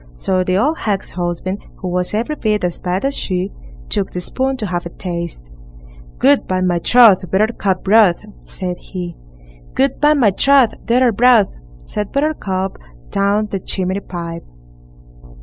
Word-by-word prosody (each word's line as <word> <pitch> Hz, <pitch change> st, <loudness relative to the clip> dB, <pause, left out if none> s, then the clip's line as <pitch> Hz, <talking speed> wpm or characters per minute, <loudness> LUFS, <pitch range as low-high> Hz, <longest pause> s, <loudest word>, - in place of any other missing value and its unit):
So 185 Hz, -, 0 dB
the 185 Hz, 0 st, 0 dB
old 295 Hz, +10 st, +1 dB
hag's 200 Hz, -3 st, -2 dB
husband, 180 Hz, +2 st, -3 dB
who 185 Hz, -, -7 dB
was 180 Hz, +2 st, -1 dB
every 235 Hz, +8 st, -1 dB
bit 210 Hz, -7 st, 0 dB
as 175 Hz, -1 st, -2 dB
bad 185 Hz, +5 st, -2 dB
as 275 Hz, 0 st, 0 dB
she, 185 Hz, +1 st, -2 dB, 0.4 s
took 195 Hz, -, 0 dB
the 180 Hz, -, -5 dB
spoon 265 Hz, +8 st, -2 dB
to 215 Hz, -, -3 dB
have 175 Hz, -2 st, -2 dB
a -, -, -9 dB
taste. 170 Hz, -, -6 dB, 0.7 s
Good, 280 Hz, +1 st, +3 dB
by 185 Hz, 0 st, 0 dB
my 180 Hz, -2 st, +1 dB
troth! 210 Hz, -3 st, +5 dB
Buttercup 195 Hz, -2 st, 0 dB
broth, 205 Hz, -2 st, +4 dB, 0.2 s
said 180 Hz, -2 st, -5 dB
he. 175 Hz, -3 st, -7 dB, 0.6 s
Good, 270 Hz, 0 st, +1 dB
by 300 Hz, +1 st, +5 dB
my 235 Hz, -8 st, +4 dB
troth! 270 Hz, +3 st, +4 dB
Daughter 245 Hz, +1 st, +3 dB
broth, 230 Hz, -2 st, +4 dB, 0.3 s
said 210 Hz, -, -4 dB
Buttercup 200 Hz, -11 st, -1 dB, 0.3 s
down 205 Hz, +2 st, +1 dB
the 195 Hz, -, -2 dB
chimney 185 Hz, +1 st, -2 dB
pipe. 170 Hz, -3 st, -7 dB
195 Hz, 155 wpm, -18 LUFS, 180-235 Hz, 0.7 s, troth